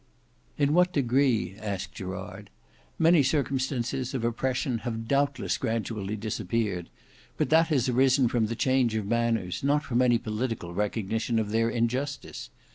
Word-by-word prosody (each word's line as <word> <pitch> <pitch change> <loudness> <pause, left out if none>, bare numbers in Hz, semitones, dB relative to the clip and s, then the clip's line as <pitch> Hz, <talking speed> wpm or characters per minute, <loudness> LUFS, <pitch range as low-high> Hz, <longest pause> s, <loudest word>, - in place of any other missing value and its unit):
"In 145 0 +2
what 180 +2 +4
degree?" 125 - +1
asked 100 -3 -4
Gerard. 95 +2 -7 0.5
"Many 165 -1 +5
circumstances 130 -2 -1
of 125 - -2
oppression 125 +1 -1
have 115 -1 -4
doubtless 140 -1 0
gradually 110 -2 -2
disappeared: 105 -3 -2 0.5
but - - 0
that 165 +1 +5
has 140 -6 +1
arisen 130 +1 +4
from 115 -2 +1
the 115 - -3
change 130 -2 +2
of 110 -2 -1
manners, 115 -4 0
not 145 +2 +2
from 125 -3 0
any 120 -2 +4
political 110 -5 -4
recognition 110 +3 -1
of 105 -2 -1
their 115 +1 +2
injustice. 125 +5 -2
115 Hz, 140 wpm, -27 LUFS, 110-135 Hz, 0.5 s, Many